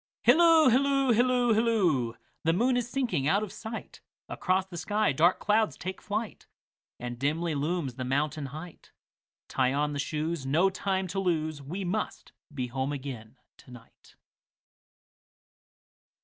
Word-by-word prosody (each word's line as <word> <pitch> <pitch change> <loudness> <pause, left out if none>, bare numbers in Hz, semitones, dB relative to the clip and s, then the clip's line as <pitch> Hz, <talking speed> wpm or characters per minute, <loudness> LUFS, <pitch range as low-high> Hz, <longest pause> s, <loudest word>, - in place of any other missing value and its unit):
Hilloo, 320 +3 +6
hilloo, 275 +1 +3
hilloo, 245 0 +3
hilloo! 185 - +2 0.3
The 165 - +3
moon 245 +8 +2
is 245 -1 -1
sinking 230 - -1
out 200 +6 +2
of 205 - -6
sight, 220 0 -8 0.3
Across 185 0 0
the 185 -2 -9
sky 210 +3 +1
dark 165 +6 +3
clouds 215 +1 +1
take 185 +1 -6
flight, 210 +1 -4 0.5
And 120 0 -6
dimly 155 +4 0
looms 150 -1 -1
the 130 - -3
mountain 140 +2 -1
height; 155 +5 -10 0.6
Tie 130 -1 +1
on 150 +1 0
the 145 - -3
shoes, 155 +1 -2
no 160 +8 +2
time 190 0 -1
to 195 - -2
lose, 160 -5 -1
We 180 +8 -5
must 210 +5 -3 0.2
be 130 -4 -3
home 130 +3 -3
again 130 -4 -7 0.2
to - - -18
night. 125 -2 -16
175 Hz, 145 wpm, -28 LUFS, 140-215 Hz, 0.6 s, Hilloo